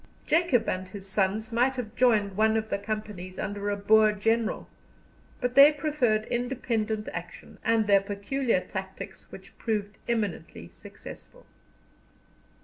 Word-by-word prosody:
Jacob 305 Hz, -8 st, +2 dB
and 185 Hz, 0 st, -2 dB
his 195 Hz, -2 st, -8 dB
sons 205 Hz, +3 st, 0 dB
might 250 Hz, +3 st, +2 dB
have 240 Hz, -3 st, -6 dB
joined 215 Hz, -6 st, +3 dB
one 220 Hz, +2 st, +3 dB
of 220 Hz, 0 st, -3 dB
the -, -, 0 dB
companies 205 Hz, -3 st, -5 dB
under 205 Hz, -1 st, -3 dB
a 205 Hz, -, 0 dB
Boer 215 Hz, +1 st, +5 dB
general, 225 Hz, +2 st, 0 dB, 0.7 s
but 245 Hz, -1 st, -1 dB
they 280 Hz, +3 st, +9 dB
preferred 280 Hz, -8 st, 0 dB
independent 230 Hz, -3 st, -2 dB
action, -, -, -9 dB
and 225 Hz, -1 st, +2 dB
their 200 Hz, -1 st, +5 dB
peculiar 205 Hz, +4 st, -1 dB
tactics, 190 Hz, +1 st, -8 dB
which -, -, -12 dB
proved 210 Hz, -2 st, -3 dB
eminently 210 Hz, -8 st, -3 dB
successful. -, -, -13 dB
215 Hz, 135 wpm, -27 LUFS, 200-240 Hz, 0.7 s, they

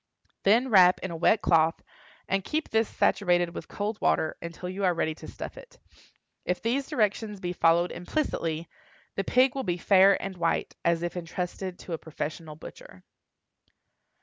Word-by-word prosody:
Then 230 Hz, +6 st, +3 dB
wrap 185 Hz, -4 st, +6 dB
in 190 Hz, -, -3 dB
a -, -, -5 dB
wet 200 Hz, +6 st, +2 dB
cloth, 165 Hz, -1 st, +3 dB, 0.4 s
and 195 Hz, 0 st, 0 dB
keep 310 Hz, -, -2 dB
this 225 Hz, 0 st, +2 dB
saturated 175 Hz, -3 st, +1 dB
with -, -, -7 dB
cold 210 Hz, +1 st, -4 dB
water 160 Hz, -, +1 dB
until 170 Hz, +2 st, -7 dB
you 190 Hz, +2 st, -4 dB
are 180 Hz, -2 st, +3 dB
ready 160 Hz, -1 st, 0 dB
to -, -, -12 dB
stuff -, -, -8 dB
it. -, -, -16 dB, 0.7 s
If 180 Hz, -, -1 dB
these 260 Hz, +4 st, -1 dB
directions 210 Hz, -1 st, -1 dB
be 180 Hz, -1 st, -3 dB
followed 170 Hz, +1 st, +3 dB
implicitly, 170 Hz, -, -2 dB, 0.5 s
the 195 Hz, -, -1 dB
pig 255 Hz, +4 st, +3 dB
will 270 Hz, -, -2 dB
be 180 Hz, -8 st, -2 dB
fair 195 Hz, +2 st, +5 dB
and 195 Hz, -1 st, -5 dB
white, 170 Hz, -1 st, -1 dB
as 170 Hz, 0 st, +1 dB
if 175 Hz, 0 st, -3 dB
intrusted 180 Hz, +1 st, -5 dB
to 175 Hz, -, -8 dB
a 160 Hz, -, -3 dB
professional 155 Hz, 0 st, -6 dB
butcher. -, -, -12 dB
180 Hz, 170 wpm, -27 LUFS, 170-210 Hz, 0.7 s, wrap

